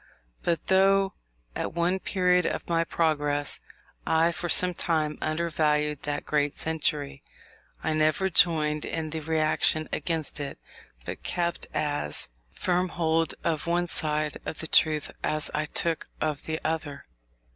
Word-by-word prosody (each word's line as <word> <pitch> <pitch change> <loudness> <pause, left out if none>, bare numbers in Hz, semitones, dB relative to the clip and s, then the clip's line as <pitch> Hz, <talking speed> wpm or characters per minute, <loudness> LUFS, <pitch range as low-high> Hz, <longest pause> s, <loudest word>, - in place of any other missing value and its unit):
But 165 -3 -1
though, 195 +1 +4 0.4
at - - -3
one 175 +2 +1
period 180 -2 +2
of - - -3
my 165 -1 +2
progress, 145 -3 +1 0.5
I 165 +1 +4
for 175 +1 -4
some 180 +2 +4
time 155 -3 -1
undervalued 155 -2 0
that 145 0 -3
great 145 -1 +1
century, 150 -3 -1 0.6
I 160 - +1
never 155 +4 +2
joined 155 -4 +3
in 160 -2 -3
the 160 - -2
reaction 155 0 +2
against 155 -1 -2
it, 140 -1 -4 0.5
but - - -6
kept 175 -1 -2
as 145 - -1 0.2
firm 180 - 0
hold 165 -1 +1
of 160 -1 -1
one 175 +1 +2
side 150 -2 0
of - - -5
the 160 - -4
truth 155 -2 +3
as 155 -1 0
I 150 0 0
took 165 +1 0
of 155 -2 -2
the 160 0 -2
other. 155 -3 -3
160 Hz, 140 wpm, -27 LUFS, 150-170 Hz, 0.6 s, though